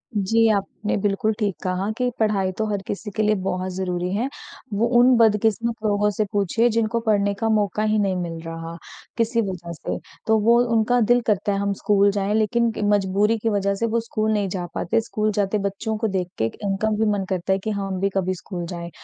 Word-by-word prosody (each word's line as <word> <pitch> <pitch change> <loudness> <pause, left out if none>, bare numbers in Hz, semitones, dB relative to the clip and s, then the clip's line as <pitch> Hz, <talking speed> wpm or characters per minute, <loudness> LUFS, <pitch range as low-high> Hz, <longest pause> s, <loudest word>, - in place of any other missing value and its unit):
जी, 225 +3 +3
आपने 205 +1 -1
बिल्कुल 205 +2 0
ठीक 205 -4 0
कहा 185 +2 -1
कि 250 -1 +1
पढ़ाई 200 -4 +1
तो 220 - 0
हर 200 -2 -1
किसी 205 +1 -5
के 215 - +1
लिए 215 0 +3
बहुत 185 0 -2
ज़रूरी 180 -1 -2
है। 240 +5 0 0.5
वो 225 +4 +2
उन 250 +1 +6
बदकिस्मत 225 +1 +2
लोगों 210 0 +2
से 215 - +2
पूछिए 205 +4 +2
जिनको 230 +1 0
पढ़ने 205 -1 +2
का 225 -1 0
मौका 210 -1 +1
ही 215 0 +2
नहीं 195 -2 +1
मिल 170 -2 -4
रहा, 165 0 -6 0.4
किसी 230 0 +1
वज़ह 175 -2 -6
से। - - -4 0.3
तो 220 0 +4
वो 230 +3 +4 0.2
उनका 235 +2 +3
दिल 240 +3 +4
करता 205 -1 +1
है, 195 - -1
हम 200 0 0
स्कूल 200 0 +3
जाएँ। 200 +1 -1
लेकिन 230 +2 +2 0.2
मजबूरी 205 +3 +2
की 225 +1 -1
वज़ह 200 -1 +1
से 230 +4 -1
वो 230 +1 +1
स्कूल 220 -1 -1
नहीं 200 -2 0
जा 180 -1 -3
पाते, 225 +6 +1
स्कूल 215 -1 -1
जाते 205 0 0
बच्चों 200 +3 -2
को 225 0 0
देख 185 -3 -1
के 110 - +1 0.2
इनका 200 +2 0
भी 220 - +2
मन 200 -2 -1
करता 190 0 0
है, 195 - 0
कि 215 - -4
हम 195 -2 -3
भी 195 +1 +1
कभी 185 -1 +1
स्कूल 175 -1 -6
जाएँ। 170 -1 -6
205 Hz, 215 wpm, -23 LUFS, 190-220 Hz, 0.5 s, उन